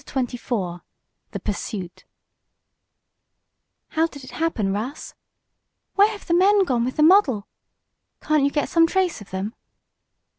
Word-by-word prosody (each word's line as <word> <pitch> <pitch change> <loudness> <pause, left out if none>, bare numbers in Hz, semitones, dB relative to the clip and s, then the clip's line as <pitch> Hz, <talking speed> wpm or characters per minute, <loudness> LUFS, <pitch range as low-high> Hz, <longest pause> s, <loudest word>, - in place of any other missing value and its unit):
CHAPTER 255 -3 -3
XXIV 180 -9 -3 0.5
THE - - -5
PURSUIT 200 -3 -5 1.8
"How 320 +1 +1
did 285 -4 -12
it 260 - -10
happen, 235 -12 -1
Russ?" 235 +8 -5 0.8
"Where 405 +1 +5
have 420 -2 -8
the 340 - 0
men 390 +3 +5
gone 250 -9 0
with 255 +2 -2
the 300 - +3
model?" 305 - +5 0.7
"Can't 305 -2 +1
you 280 - +3
get 290 0 -1
some 330 -1 +4
trace 365 - 0
of 205 - -12
them?" 190 +4 -4
280 Hz, 140 wpm, -23 LUFS, 215-335 Hz, 1.8 s, Where